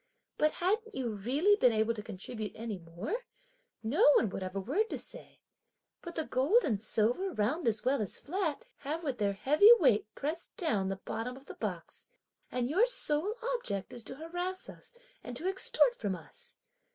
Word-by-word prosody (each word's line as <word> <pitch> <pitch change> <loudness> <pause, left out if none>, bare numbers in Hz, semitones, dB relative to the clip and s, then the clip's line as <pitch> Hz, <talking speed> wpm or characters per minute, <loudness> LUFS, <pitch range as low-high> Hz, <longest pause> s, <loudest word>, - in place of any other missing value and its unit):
But 305 0 +3
hadn't 435 +5 0
you 245 -3 -2
really 270 - +3
been 250 - +5
able 220 +1 +2
to 215 - -5
contribute 210 +2 -6
any 220 -3 -5
more, 170 - -4 0.7
no 280 - +2
one 215 - +3
would - - -4
have 185 0 -5
a - - 0
word 335 - 0
to - - -2
say; - - -9 0.6
but 345 -1 -8
the 320 - 0
gold 310 - +3
and 215 -7 0
silver, 230 - +1
round 240 +8 0
as 220 +1 0
well 265 0 +2
as 205 - -3
flat, 360 +5 -2
have 305 +4 -4
with 270 -6 -2
their 200 -1 +1
heavy 300 - +6
weight 245 - +4
pressed 315 +4 -4
down 210 - +1
the 195 - -1
bottom 225 +6 -5
of 270 - -15
the - - -8
box! - - -5 0.4
and 250 -1 0
your 380 - +4
sole 380 -3 0 0.2
object 200 - -3
is 240 - -8
to 260 - -6
harass 355 +5 -4
us - - -11 0.3
and 245 -1 -6
to 345 - -3
extort 385 +5 +3
from 205 - -2
us. 480 - -13
265 Hz, 190 wpm, -32 LUFS, 215-350 Hz, 0.7 s, heavy